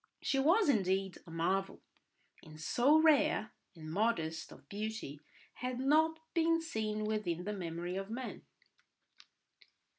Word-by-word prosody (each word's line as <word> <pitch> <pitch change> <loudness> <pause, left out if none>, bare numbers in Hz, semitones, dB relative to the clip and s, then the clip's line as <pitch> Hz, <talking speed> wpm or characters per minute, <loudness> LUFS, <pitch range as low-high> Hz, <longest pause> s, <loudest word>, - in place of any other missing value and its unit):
She 270 - 0
was 350 +10 +4
indeed 195 -6 +1
a - - -10
marvel, 185 +4 -1 0.6
and 155 -1 -13
so 250 - +4
rare 305 -7 +3 0.2
and 155 -1 -8
modest 165 -5 -1
of - - -15
beauty 210 -7 -5 0.3
had 250 0 -4
not 315 +4 +3 0.2
been 330 -1 +3
seen 215 -9 -2
within 210 -6 -1
the 210 +3 -3
memory 175 -1 -4
of 195 +1 -4
man. 250 +3 -5
215 Hz, 125 wpm, -34 LUFS, 180-275 Hz, 0.6 s, was